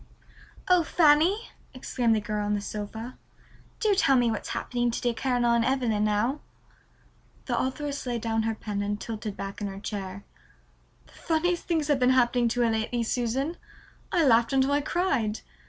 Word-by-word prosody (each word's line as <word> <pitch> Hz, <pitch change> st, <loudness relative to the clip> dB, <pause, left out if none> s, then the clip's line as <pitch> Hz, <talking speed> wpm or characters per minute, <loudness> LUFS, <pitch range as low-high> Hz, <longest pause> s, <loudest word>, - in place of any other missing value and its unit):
"Oh, 365 Hz, -2 st, +5 dB
Fanny," 325 Hz, +7 st, +3 dB, 0.2 s
exclaimed 245 Hz, -3 st, 0 dB
the -, -, +1 dB
girl 210 Hz, 0 st, -3 dB
on 205 Hz, 0 st, 0 dB
the -, -, -1 dB
sofa, 215 Hz, +4 st, -6 dB, 0.6 s
"do 430 Hz, -2 st, +3 dB
tell 275 Hz, -8 st, +4 dB
me 240 Hz, -2 st, +3 dB
what's 220 Hz, -, -4 dB
happening 240 Hz, -1 st, -1 dB
to 235 Hz, -, -2 dB
dear 240 Hz, -1 st, 0 dB
Caroline 240 Hz, -2 st, +1 dB
Evelyn 240 Hz, -5 st, +1 dB
now." 215 Hz, +7 st, +1 dB, 1.1 s
The -, -, -1 dB
authoress 280 Hz, +1 st, -3 dB
laid 240 Hz, -2 st, -2 dB
down 225 Hz, 0 st, 0 dB
her 225 Hz, 0 st, -1 dB
pen 210 Hz, -2 st, -4 dB
and 205 Hz, 0 st, -2 dB
tilted 215 Hz, -2 st, -5 dB
back 195 Hz, +2 st, -6 dB
in 205 Hz, -, -1 dB
her 195 Hz, 0 st, -7 dB
chair. 200 Hz, -2 st, -6 dB, 0.8 s
"The -, -, -22 dB
funniest 345 Hz, +2 st, -1 dB
things 320 Hz, -4 st, 0 dB
have 290 Hz, -3 st, +2 dB
been 250 Hz, 0 st, +4 dB
happening 240 Hz, -1 st, +3 dB
to 245 Hz, +1 st, 0 dB
her 235 Hz, -1 st, +3 dB
lately, 225 Hz, +2 st, -1 dB
Susan. 255 Hz, +8 st, -1 dB, 0.5 s
I 340 Hz, -4 st, +3 dB
laughed 230 Hz, -1 st, +4 dB
until 270 Hz, +1 st, +3 dB
I 290 Hz, +1 st, +2 dB
cried. 280 Hz, -, 0 dB
240 Hz, 170 wpm, -27 LUFS, 215-280 Hz, 1.1 s, Oh